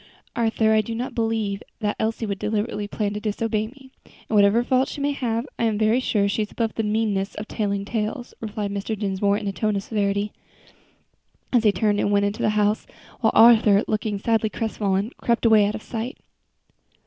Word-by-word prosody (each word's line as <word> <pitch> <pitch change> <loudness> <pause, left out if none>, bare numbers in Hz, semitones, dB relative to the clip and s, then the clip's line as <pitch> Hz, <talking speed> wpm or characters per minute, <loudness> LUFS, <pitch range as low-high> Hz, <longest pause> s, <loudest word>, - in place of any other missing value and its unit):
"Arthur, 225 -2 +2
I 215 - +4
do 225 +2 -5
not 245 +3 -4
believe 220 -3 -1 0.2
that 210 -2 -1
Elsie 225 +1 -1
would 200 -2 -3
deliberately 210 -1 -2
plan 205 0 -2
to 210 - -3
disobey 215 0 -1
me; 265 +2 -16 0.2
and 220 - -7
whatever 205 +3 +5
faults 260 +1 +1
she - - -7
may 285 +1 +1
have, 235 -4 -2
I 235 - +2
am 220 -2 +1
very 220 +3 +3
sure 210 -5 +1
she 200 +2 0
is 210 - -2
above 225 -2 -2
the - - -1
meanness 210 -2 -1
of 215 - -6
telling 200 -2 -2
tales," 225 +4 -3
replied 210 -2 -3
Mr. 200 +2 -3
Dinsmore, 200 0 0
in 205 - -5
a - - 0
tone 215 +1 -1
of 195 - -2
severity, 205 -1 -1 1.2
as 235 -2 +3
he 210 - +6
turned 205 0 +1
and 205 - +1
went 200 0 +3
into 205 +1 -2
the - - +2
house, 210 0 +1 0.3
while 220 - +2
Arthur, 220 -3 +7
looking 215 -1 -1
sadly 220 +1 +1
crestfallen, 210 -2 -1
crept 235 0 0
away 215 -3 +6
out 210 - -2
of 220 - -7
sight. 230 +2 -5
215 Hz, 200 wpm, -23 LUFS, 205-225 Hz, 1.2 s, Arthur